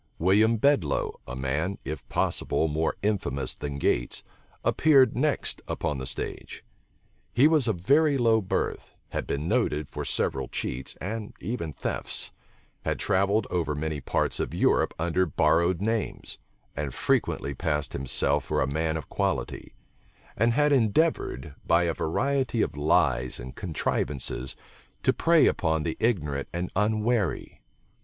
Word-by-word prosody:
William 105 +6 +4
Bedloe, 110 - +1
a - - -5
man, 75 +9 -1
if 75 +3 -6
possible, 80 - +1
more 80 +1 0
infamous 70 - 0
than 70 -1 -5
Gates, - - 0 0.4
appeared 135 -6 +4
next 145 +4 0
upon 70 - -2
the 65 - -4
stage. - - -4 0.7
He 130 +6 +5
was 155 -6 +3
of 110 - +1
very 145 - +4
low 115 -3 +3
birth, 95 - -3
had - - -3
been 70 +3 -2
noted 85 - +1
for - - -5
several - - -1
cheats, 65 +1 -4
and 105 +3 -5
even 90 -6 -3
thefts; - - -3 0.5
had - - -1
travelled 100 +3 +2
over 85 -4 0
many 75 -1 -3
parts - - -1
of - - -2
Europe - - +2
under 85 +3 +1
borrowed 85 +4 +2
names, 110 0 -2 0.4
and 70 -3 -3
frequently 70 - 0
passed 75 +1 -2
himself 70 -2 +1
for - - -1
a - - +3
man 80 +3 -1
of 80 - -7
quality; - - -2 0.6
and 115 +2 +2
had 150 +3 +3
endeavored, 115 - +1
by 85 +1 +3
a 85 -1 +1
variety 130 - 0
of - - -3
lies 70 -4 +1
and 65 +2 -8
contrivances, 65 -2 -2 0.5
to - - +4
prey 165 -2 +4
upon 80 -2 +1
the 80 - -2
ignorant 75 - 0
and 85 +1 -3
unwary. 110 -1 0
85 Hz, 140 wpm, -27 LUFS, 75-115 Hz, 0.7 s, He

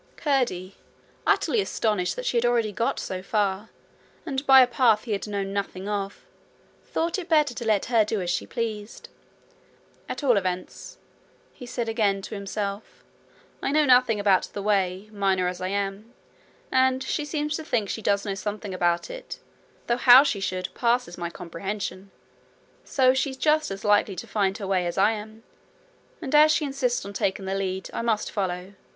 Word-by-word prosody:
Curdie, 245 - -1 0.5
utterly 445 - +3
astonished 210 - -1
that - - -6
she - - -1
had 235 - +3
already 235 -3 +2
got 230 +4 -1
so 185 -1 -4
far, 200 +1 -1 0.6
and 275 -4 -2
by 265 -1 +9
a - - +7
path 235 -3 +3
he 235 - -6
had 200 0 -2
known 200 -1 -3
nothing 195 -1 -4
of, 200 -1 -4 0.6
thought 335 +4 -2
it 355 - -8
better 300 -5 +3
to 240 - -6
let 215 -3 +2
her 230 -2 +3
do 215 0 -2
as 180 -2 -2
she 180 - -2
pleased. 220 -2 -5 1.0
'At - - -5
all 245 -6 +4
events,' 185 -1 -4 0.6
he 250 - -11
said 240 -1 -3
again 205 -4 0
to - - -7
himself, 200 0 -5 0.6
'I 275 - -1
know 305 0 +4
nothing 250 -4 +4
about 200 -2 +2
the 200 - -5
way, 195 -1 0
miner 190 -3 +1
as 180 0 -4
I 185 - -1
am; 200 +3 -3 0.6
and 260 0 +3
she 295 - -2
seems 300 0 -2
to 320 - -7
think 230 -9 -1
she 220 - -4
does 200 0 +1
know 200 - -2
something 205 0 -5
about 175 - 0
it, - - -8 0.5
though 240 - +1
how 250 +1 +8
she 250 -8 -1
should 185 -1 -3
passes 240 -6 0
my 170 -1 -4
comprehension. 190 +3 -6 0.7
So 255 -2 +3
she's 265 0 -1
just 310 +2 +2
as 195 +2 -6
likely 205 -1 +3
to - - -6
find 195 -2 0
her 205 - -6
way 185 -2 0
as 170 - -4
I 200 +3 +4
am, 220 +1 -8 0.8
and 270 - -4
as 305 +1 +7
she 310 -1 +1
insists 265 -6 -1
on 200 - -7
taking 195 0 -1
the 190 - -2
lead, 190 -1 -3
I - - -2
must 225 -2 0
follow. 185 -1 -3
210 Hz, 180 wpm, -25 LUFS, 195-250 Hz, 1.0 s, by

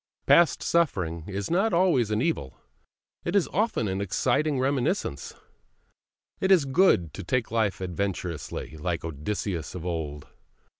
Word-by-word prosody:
Past 170 -1 +5
suffering 90 - 0
is 100 +4 -4
not 195 +6 +2
always 170 - +3
an 110 +3 0
evil, 110 - -2 0.7
it 175 - -2
is 200 - +3
often 210 - 0
an 95 +1 -2
exciting 130 - +1
reminiscence. 135 - -1 1.0
It 190 - +1
is 175 -7 +6
good 135 - +3
to - - -7
take 125 +5 -1
life 110 -5 0
adventurously, 90 -4 -4
like 85 +1 -3
Odysseus 80 +3 -4
of 90 -1 -6
old. 80 -4 -4
105 Hz, 135 wpm, -26 LUFS, -, 1.0 s, is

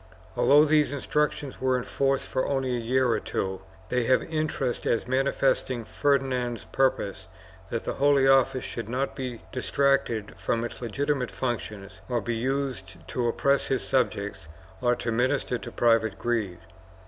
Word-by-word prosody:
1 - - -1
Although 145 +2 +8
these 150 -1 +3
Instructions 145 0 -1
were 130 -1 +2
in 125 - -3
force 135 +2 0
for 130 - -1
only 135 -2 0
a - - -1
year 130 +3 +2
or - - +1
two, 95 0 -3 0.3
they 125 -1 +1
have 130 +2 +3
interest 155 -6 -2
as 115 - +1
manifesting 130 -2 +1
Ferdinand's 130 -4 0
purpose 105 -8 0 0.4
that 115 - -3
the - - -2
Holy 140 -1 +4
Office 135 -1 +4
should 115 -2 -5
not 130 +3 -2
be 125 -4 -5
dis 130 - -4
tracted 140 -6 +1
from 115 0 -1
its 120 - -6
legitimate 135 +2 -1
functions 110 -5 -4
or 120 -1 +1
be 115 +2 -2
used 115 - -3
to 120 -2 -1
oppress 140 +4 +2
his 135 - 0
subjects 105 - -1 0.3
or 120 -1 +3
to 115 - -3
minister 125 +1 0
to - - -8
private 115 -3 +2
greed. 110 -7 -1
125 Hz, 160 wpm, -27 LUFS, 115-135 Hz, 0.4 s, Although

